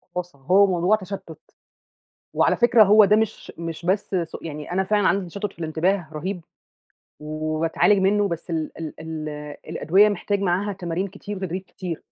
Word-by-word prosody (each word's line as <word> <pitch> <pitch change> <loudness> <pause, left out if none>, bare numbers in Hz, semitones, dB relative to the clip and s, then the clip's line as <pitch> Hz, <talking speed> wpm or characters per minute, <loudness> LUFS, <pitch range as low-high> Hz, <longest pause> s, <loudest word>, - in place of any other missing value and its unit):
بُص، 180 -3 -4
هو 185 +9 +4
موضوع 180 +3 +3
تشتُّت. 190 -5 -8 0.9
وعلى - - +3
فكرة 240 -2 +6
هو 210 +1 +7
ده 210 - +4
مش 220 -1 -2
مش 165 0 -6
بس 190 +1 0
سوء 165 - -9
يعني 150 +1 -6
أنا 190 +1 +1
فعلًا 205 0 +2
عندي 195 -1 +1
تشتُّت 200 +3 -5
في - - -23
الإنتباه 165 +3 0
رهيب 180 +4 -4 0.8
وباتعالج 155 +6 +1
منّه، 200 +1 +2
بس 170 0 -5
ال 160 -2 -2
ال 160 -2 -6
ال 160 -1 -5 0.4
الأدوية 200 +5 +4
محتاج 200 0 -1
معاها 195 +2 0
تمارين 185 0 -3
كتير 200 +1 -8
وتدريب 185 0 -4
كتير. 180 -3 -7
185 Hz, 165 wpm, -23 LUFS, 165-200 Hz, 0.9 s, هو